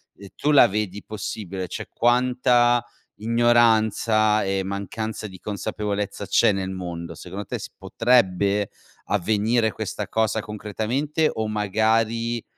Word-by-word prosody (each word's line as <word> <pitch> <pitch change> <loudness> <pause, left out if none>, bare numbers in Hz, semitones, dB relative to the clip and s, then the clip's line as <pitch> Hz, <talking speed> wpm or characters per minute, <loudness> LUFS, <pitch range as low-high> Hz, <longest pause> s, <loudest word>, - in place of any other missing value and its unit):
E 100 -1 -12
tu 150 - 0
la 140 -5 +7
vedi 105 -1 -3
possibile? 100 -3 -5
Cioè - - -6
quanta 120 0 +3 0.3
ignoranza 110 -1 +3
e 95 0 0
mancanza 100 +3 -4
di 95 -2 -12
consapevolezza 105 0 -4
c'è 100 - +4
nel 95 -1 -2
mondo, 85 -3 -6
secondo 95 +5 -7
te - - -4
si - - -8
potrebbe 100 -4 +1 0.4
avvenire 110 +3 +1
questa - - -5
cosa 110 0 0
concretamente 110 +9 -2
o 110 -1 -2
magari, 110 +2 0
110 Hz, 120 wpm, -23 LUFS, 100-115 Hz, 0.4 s, la